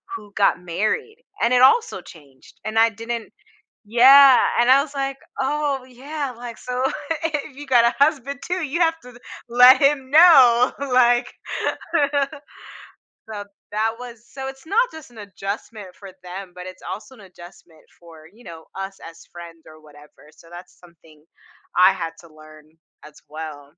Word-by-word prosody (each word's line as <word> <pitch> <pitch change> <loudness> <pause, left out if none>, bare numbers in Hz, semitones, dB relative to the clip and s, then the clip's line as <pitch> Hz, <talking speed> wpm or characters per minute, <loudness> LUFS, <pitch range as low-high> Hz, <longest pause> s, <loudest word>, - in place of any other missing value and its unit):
who 205 - -12
got 195 -4 +2
married, 215 - -3 0.2
and 235 +2 +2
it 250 - +4
also 360 - +3
changed, 140 -5 -18
and 215 +1 -4
I 230 0 +5
didn't 230 +1 -7 0.6
yeah, 265 +3 +7 0.2
and 240 +1 +3
I 275 +1 +6
was 290 0 -8
like, 275 0 -3 0.2
"Oh 280 -1 -2
yeah," 275 +2 -6
like, 240 -1 -9
"so 250 0 -4 0.4
if 295 -3 -4
you 290 0 -10
got 240 -3 +4
a 235 - +2
husband 280 -2 -2
too, 360 -1 -3
you 310 +5 -4
have 325 -1 +1
to 250 -1 -14 0.3
let 250 +2 +7
him 275 -2 +1
know," 265 -7 +6
like. 250 -2 +2 2.0
So 205 -1 -7 0.3
that 220 +1 0
was 240 -2 -11
so 265 -1 -7
it's 270 +2 -10
not 465 +8 +1
just 315 -5 -13
an 235 - -18
adjustment 200 0 -8
for 195 -2 -12
them, 185 +1 -9
but 180 0 -9
it's 185 - -12
also 215 +5 -8
an 215 - -17
adjustment 175 -3 -16 0.2
for, 165 -2 -16
you 240 +3 -20
know, 165 -1 -12
us 195 0 -7
as 165 - -15
friends 170 -1 -12
or 155 0 -16
whatever. 150 0 -19
So 165 - -20
that's 175 +1 -13
something 165 -3 -21 0.5
I 185 +1 +6
had 165 -3 -5
to 170 - -17
learn 155 0 -17 0.4
as 150 0 -15
well. 150 -2 -9
235 Hz, 165 wpm, -21 LUFS, 180-270 Hz, 2.0 s, yeah